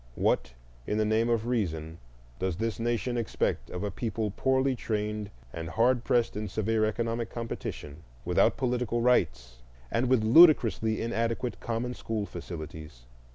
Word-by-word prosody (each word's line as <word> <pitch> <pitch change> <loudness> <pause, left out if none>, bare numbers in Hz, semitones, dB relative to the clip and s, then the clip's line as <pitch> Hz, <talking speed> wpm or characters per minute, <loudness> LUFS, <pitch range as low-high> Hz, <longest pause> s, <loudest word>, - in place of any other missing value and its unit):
What 60 - 0 0.3
in 105 - 0
the 110 - +2
name 110 +2 +2
of 115 -1 +1
reason 85 -9 -2 0.4
does 95 -2 -1
this 115 0 -2
nation 120 +1 -1
expect 105 - -1
of 90 - -5
a 105 - -2
people, 110 +1 -2
poorly 130 0 +2
trained 105 -2 -3 0.2
and 80 -1 -5
hard 120 +7 +2
pressed 120 -1 +1
in 105 0 -3
severe 110 +2 0
economic 115 +1 -2
competition, 115 -10 -6 0.3
without - - +3
political 125 -2 0
rights, 60 - +1 0.3
and 120 +2 +1
with 130 -4 +3
ludicrously 115 -5 +6
inadequate 115 +1 -2
common 120 +2 -3
school 110 -4 -3
facilities? 80 -9 -8
115 Hz, 145 wpm, -29 LUFS, 100-120 Hz, 0.4 s, ludicrously